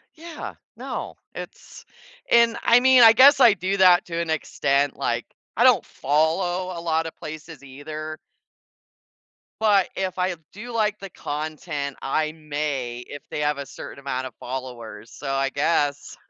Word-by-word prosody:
Yeah. 330 Hz, 0 st, -8 dB, 0.2 s
No, -, -, -6 dB, 0.2 s
it's -, -, -10 dB, 0.5 s
and 235 Hz, -1 st, +5 dB
I 235 Hz, -, +6 dB
mean 260 Hz, -1 st, +6 dB
I 225 Hz, 0 st, +9 dB
guess 275 Hz, +4 st, +7 dB
I 240 Hz, -5 st, +7 dB
do 190 Hz, +1 st, -2 dB
that 180 Hz, -2 st, +6 dB
to 165 Hz, -1 st, -5 dB
an 170 Hz, -1 st, -3 dB
extent, 140 Hz, -2 st, 0 dB
like, -, -, -1 dB, 0.3 s
I -, -, +4 dB
don't -, -, +5 dB
follow 175 Hz, +5 st, 0 dB
a 170 Hz, -, -5 dB
lot 165 Hz, -1 st, 0 dB
of 165 Hz, -, -7 dB
places 155 Hz, -2 st, -9 dB
either 155 Hz, +3 st, -7 dB, 1.4 s
but 205 Hz, -4 st, +3 dB
if 190 Hz, -1 st, -3 dB
I 180 Hz, 0 st, 0 dB, 0.2 s
do 235 Hz, +5 st, -8 dB
like 215 Hz, -2 st, 0 dB
the 195 Hz, -, -8 dB
content 150 Hz, -2 st, -5 dB
I 155 Hz, +3 st, 0 dB
may, 145 Hz, -6 st, -4 dB
if 145 Hz, -, -9 dB
they 150 Hz, -, -4 dB
have 150 Hz, -1 st, 0 dB
a 140 Hz, -, -5 dB
certain 135 Hz, -, -10 dB
amount 130 Hz, -2 st, -3 dB
of -, -, -13 dB
followers, 125 Hz, -3 st, -7 dB
so 135 Hz, -, -6 dB
I 135 Hz, 0 st, 0 dB
guess 145 Hz, 0 st, 0 dB
155 Hz, 160 wpm, -23 LUFS, 140-190 Hz, 1.4 s, I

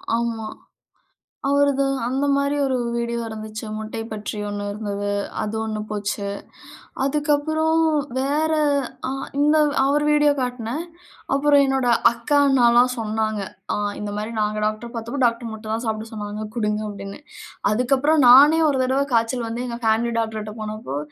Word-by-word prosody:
ஆமா. 230 Hz, -1 st, -2 dB, 1.0 s
அவரது 280 Hz, -1 st, +3 dB, 0.2 s
அந்த 270 Hz, +3 st, 0 dB
மாதிரி 280 Hz, +1 st, 0 dB
ஒரு 260 Hz, -1 st, 0 dB, 0.2 s
வீடியோ 235 Hz, 0 st, -2 dB
இருந்துச்சு. 220 Hz, 0 st, -7 dB
முட்டை 220 Hz, +1 st, -5 dB
பற்றி 210 Hz, 0 st, -5 dB
ஒன்னு 205 Hz, 0 st, -4 dB
இருந்துது. 205 Hz, -1 st, -3 dB, 0.3 s
அது 215 Hz, +1 st, -3 dB
ஒன்னு 215 Hz, -1 st, -3 dB
போச்சு. 205 Hz, -1 st, -3 dB, 0.8 s
அதுக்கப்புறம் 305 Hz, +3 st, +1 dB, 0.4 s
வேற 295 Hz, +4 st, +1 dB, 0.6 s
ஆ -, -, -2 dB, 0.3 s
இந்த 300 Hz, +2 st, +4 dB, 0.3 s
அவர் 290 Hz, +2 st, +2 dB
வீடியோ 295 Hz, -1 st, +4 dB
காட்னன். 250 Hz, +4 st, -3 dB, 0.5 s
அப்புறம் 285 Hz, 0 st, +4 dB
என்னுடைய 265 Hz, -3 st, +2 dB, 0.2 s
அக்கா, 235 Hz, +5 st, 0 dB
அண்ணா 255 Hz, -3 st, +4 dB
எல்லாம் 250 Hz, +1 st, +4 dB
சொன்னாங்க. 215 Hz, -1 st, -1 dB, 0.3 s
ஆங் 205 Hz, 0 st, -2 dB
"இந்த 210 Hz, 0 st, -4 dB
மாதிரி 215 Hz, +2 st, -4 dB
நாங்க 215 Hz, 0 st, 0 dB
டாக்டரா 215 Hz, +2 st, -3 dB
பார்த்தப்போ 235 Hz, +4 st, -4 dB
டாக்டர் 230 Hz, -1 st, -1 dB
முட்ட 220 Hz, 0 st, -10 dB
தான் 225 Hz, +2 st, -2 dB
சாப்ட 220 Hz, 0 st, -3 dB
சொன்னாங்க 210 Hz, 0 st, -5 dB
குடுங்க." 210 Hz, -2 st, 0 dB
அப்படின்னு. 195 Hz, -1 st, -8 dB, 0.5 s
அதுக்கு 250 Hz, +5 st, +2 dB
அப்புறம் 295 Hz, +2 st, +3 dB
நானே 290 Hz, +6 st, +8 dB
ஒரு 270 Hz, -2 st, 0 dB
தடவை 265 Hz, +2 st, +1 dB
காய்ச்சல் 230 Hz, +1 st, +1 dB
வந்து 235 Hz, +2 st, -4 dB
எங்க 235 Hz, -1 st, -5 dB
பேமிலி 230 Hz, +2 st, +2 dB
டாக்டர் 220 Hz, -1 st, -2 dB
கிட்ட 210 Hz, 0 st, -7 dB
போனப்போ 215 Hz, -10 st, -5 dB
235 Hz, 150 wpm, -22 LUFS, 215-275 Hz, 1.0 s, நானே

